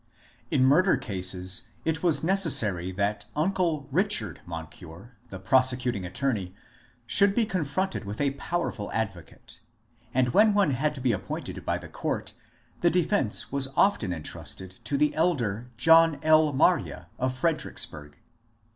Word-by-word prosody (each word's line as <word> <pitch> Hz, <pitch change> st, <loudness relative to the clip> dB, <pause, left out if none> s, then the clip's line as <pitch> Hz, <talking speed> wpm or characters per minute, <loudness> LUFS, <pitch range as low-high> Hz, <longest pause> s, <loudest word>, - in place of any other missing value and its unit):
In 135 Hz, -5 st, +2 dB
murder 180 Hz, +8 st, +4 dB
cases 95 Hz, -2 st, -2 dB, 0.2 s
it 160 Hz, 0 st, -1 dB
was 160 Hz, -5 st, +1 dB
necessary 115 Hz, -, +3 dB
that 100 Hz, +2 st, -2 dB
uncle 160 Hz, -3 st, 0 dB
Richard 200 Hz, +7 st, 0 dB
Mon 80 Hz, -2 st, -5 dB
cure, 90 Hz, +8 st, -14 dB
the 95 Hz, -, -7 dB
prosecuting 125 Hz, -2 st, +2 dB
attorney, 100 Hz, -5 st, -2 dB, 0.5 s
should 195 Hz, -, +4 dB
be 235 Hz, -, +2 dB
confronted 185 Hz, -, -2 dB
with 100 Hz, +1 st, -7 dB
a 140 Hz, -1 st, +1 dB
powerful 140 Hz, -7 st, -4 dB
advocate, 100 Hz, -7 st, -6 dB, 0.5 s
and 125 Hz, 0 st, +1 dB
when 210 Hz, -, +4 dB
one 200 Hz, -7 st, +3 dB
had 150 Hz, +4 st, -1 dB
to 135 Hz, -, -6 dB
be 125 Hz, -1 st, +2 dB
appointed 100 Hz, -4 st, -5 dB
by -, -, +1 dB
the -, -, -10 dB
court -, -, -4 dB, 0.5 s
the 175 Hz, -, +3 dB
defence 175 Hz, -, 0 dB
was 140 Hz, -1 st, -1 dB
often 120 Hz, -, +2 dB
entrusted 90 Hz, +3 st, -7 dB
to 140 Hz, -, 0 dB
the 150 Hz, +1 st, +2 dB
elder 125 Hz, -, -1 dB
John 165 Hz, +3 st, +5 dB
L. 155 Hz, -1 st, +4 dB
Marye 140 Hz, -, +1 dB
of 130 Hz, 0 st, -1 dB
Fredericksburg. 130 Hz, -, -3 dB
130 Hz, 140 wpm, -26 LUFS, 100-165 Hz, 0.5 s, John